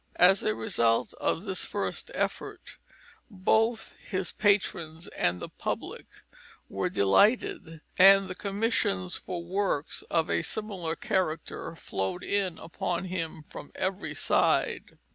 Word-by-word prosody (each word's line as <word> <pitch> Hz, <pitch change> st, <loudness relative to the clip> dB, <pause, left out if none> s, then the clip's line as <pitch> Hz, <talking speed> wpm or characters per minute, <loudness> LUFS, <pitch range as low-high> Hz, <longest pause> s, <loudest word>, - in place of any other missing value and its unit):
As 190 Hz, +2 st, +6 dB
a 105 Hz, -, 0 dB
result 115 Hz, +1 st, +1 dB
of 165 Hz, -, 0 dB
this 190 Hz, -3 st, -1 dB
first -, -, -3 dB
effort, -, -, -4 dB, 0.5 s
both 220 Hz, +3 st, +1 dB
his 185 Hz, -2 st, -3 dB
patrons 175 Hz, -5 st, 0 dB
and 85 Hz, +1 st, 0 dB
the -, -, -5 dB
public -, -, -5 dB, 0.6 s
were -, -, -2 dB
delighted, 165 Hz, -, +2 dB, 0.2 s
and 195 Hz, 0 st, +7 dB
commissions 195 Hz, -, 0 dB
for 175 Hz, -2 st, -5 dB
works 180 Hz, -4 st, -1 dB
of 165 Hz, 0 st, +2 dB
a -, -, +2 dB
similar 195 Hz, -7 st, -3 dB
character 185 Hz, -7 st, -2 dB
flowed 140 Hz, -, -3 dB
in 195 Hz, -3 st, 0 dB
upon 170 Hz, +2 st, -3 dB
him 165 Hz, -4 st, -4 dB
from 145 Hz, -, -10 dB
every 190 Hz, +1 st, -2 dB
side. -, -, +1 dB
185 Hz, 120 wpm, -28 LUFS, 160-200 Hz, 0.6 s, and